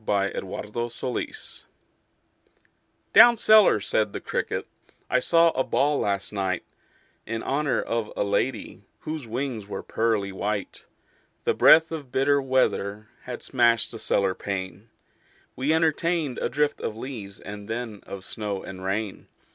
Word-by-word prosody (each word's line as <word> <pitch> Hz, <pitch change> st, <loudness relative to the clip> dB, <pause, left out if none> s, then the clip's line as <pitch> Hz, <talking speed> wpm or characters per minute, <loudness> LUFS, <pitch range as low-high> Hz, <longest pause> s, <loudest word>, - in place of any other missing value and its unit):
The 100 Hz, -2 st, +1 dB
Potato's 115 Hz, +5 st, -5 dB
Dance 125 Hz, -, -4 dB, 1.5 s
"Down 240 Hz, -1 st, +9 dB
cellar," 215 Hz, -, +6 dB
said 105 Hz, +1 st, 0 dB
the -, -, -3 dB
cricket, -, -, -3 dB, 0.5 s
"I 125 Hz, -, +4 dB
saw 165 Hz, +4 st, +4 dB
a 130 Hz, -, 0 dB
ball 145 Hz, +2 st, +1 dB
last 100 Hz, 0 st, -1 dB
night 95 Hz, -3 st, -1 dB, 0.6 s
In 115 Hz, 0 st, -3 dB
honor 145 Hz, 0 st, 0 dB
of 115 Hz, -2 st, -2 dB
a -, -, +2 dB
lady 105 Hz, 0 st, -2 dB, 0.2 s
Whose 155 Hz, -5 st, -5 dB
wings 120 Hz, -3 st, -3 dB
were -, -, -5 dB
pearly 110 Hz, -3 st, 0 dB
white. 100 Hz, +1 st, -4 dB, 0.6 s
The -, -, +2 dB
breath 160 Hz, +1 st, +6 dB
of 145 Hz, -6 st, -6 dB
bitter 140 Hz, +2 st, +3 dB
weather 110 Hz, -5 st, 0 dB, 0.2 s
Had 125 Hz, -1 st, -6 dB
smashed 120 Hz, -4 st, +2 dB
the 115 Hz, -, -7 dB
cellar 95 Hz, -3 st, +1 dB
pane: 100 Hz, +2 st, -5 dB, 0.7 s
We 135 Hz, +4 st, 0 dB
entertained 160 Hz, -2 st, +1 dB
a -, -, -1 dB
drift 145 Hz, +3 st, 0 dB
of 110 Hz, -, -4 dB
leaves 110 Hz, -6 st, -7 dB
And 100 Hz, 0 st, -9 dB
then 115 Hz, -2 st, -4 dB
of 95 Hz, -1 st, -7 dB
snow 105 Hz, -3 st, -4 dB
and 95 Hz, -1 st, -8 dB
rain. 100 Hz, +1 st, -3 dB
115 Hz, 140 wpm, -25 LUFS, 100-135 Hz, 1.5 s, Down